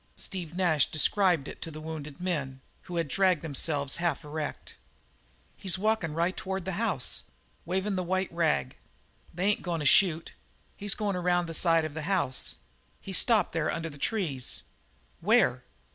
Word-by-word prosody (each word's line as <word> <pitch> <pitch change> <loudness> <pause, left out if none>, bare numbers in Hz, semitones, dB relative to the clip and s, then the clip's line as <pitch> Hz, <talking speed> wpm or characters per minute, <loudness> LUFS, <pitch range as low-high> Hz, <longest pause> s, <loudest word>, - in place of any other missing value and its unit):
Steve 175 -4 -5
Nash 170 -6 +3
described 175 -2 +3
it - - -9
to 165 - -4
the 155 -1 -8
wounded 155 -1 -7
men, 145 -8 -2 0.3
who 175 - -4
had 165 -2 0
dragged 185 +1 +2
themselves 145 -2 0
half 170 -1 -1
erect. 150 0 -5 0.8
"He's 190 -2 0
walkin' 200 -6 0
right 170 +3 +1
toward 190 -1 -4
the 190 - -2
house, 180 - +1 0.4
wavin' 190 +4 -1
the 185 - 0
white 185 0 -1
rag. 70 - +1 0.6
They 180 +3 -2
ain't 205 +1 +2
goin' 170 -2 -2
to 150 - -3
shoot. 165 +1 +4 0.4
He's 205 -1 +1
goin' 205 -2 -1
around 175 0 +2
the 165 - -6
side 165 0 +4
of 155 - -5
the 160 - -4
house. 175 -10 +1 0.4
He's 190 -1 -2
stopped 230 -4 +3
there 165 -2 0
under 165 -1 -3
the 145 - -12
trees." 155 - -2 0.6
"Where?" - - +3
170 Hz, 165 wpm, -29 LUFS, 155-190 Hz, 0.8 s, shoot